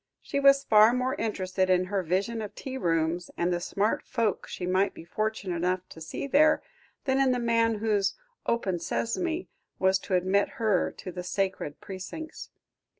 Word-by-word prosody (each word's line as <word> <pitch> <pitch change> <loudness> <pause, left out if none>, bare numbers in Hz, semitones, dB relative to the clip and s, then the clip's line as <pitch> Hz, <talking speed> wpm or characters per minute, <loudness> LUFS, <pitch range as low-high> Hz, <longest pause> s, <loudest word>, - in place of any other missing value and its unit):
She 280 - -2
was 275 0 +6
far 215 +1 +6
more 255 +1 0
interested 185 -3 -1
in 185 0 +3
her 195 +1 -1
vision 195 +7 -1
of 210 - -7
tea 265 -1 -6
rooms, 170 -4 0
and 175 +1 +1
the 175 - 0
smart 200 +4 0
folk 225 -5 -1
she 180 - -5
might 185 +2 +1
be 165 - -10
fortunate 210 -1 -2
enough 180 +2 -1
to 160 - -12
see 160 - -5
there, 300 +3 +4 0.4
than 265 -1 +2
in 265 -2 +4
the - - 0
man 230 -1 +2
whose 210 -2 +1 0.3
"open 190 -7 0
sesame" 325 - -2 0.3
was 190 0 +3
to 190 - -1
admit 190 +3 +2
her 215 -5 +2
to 185 - -8
the 180 - -5
sacred 185 -5 -2
precincts. 200 - -7
200 Hz, 175 wpm, -28 LUFS, 180-235 Hz, 0.4 s, was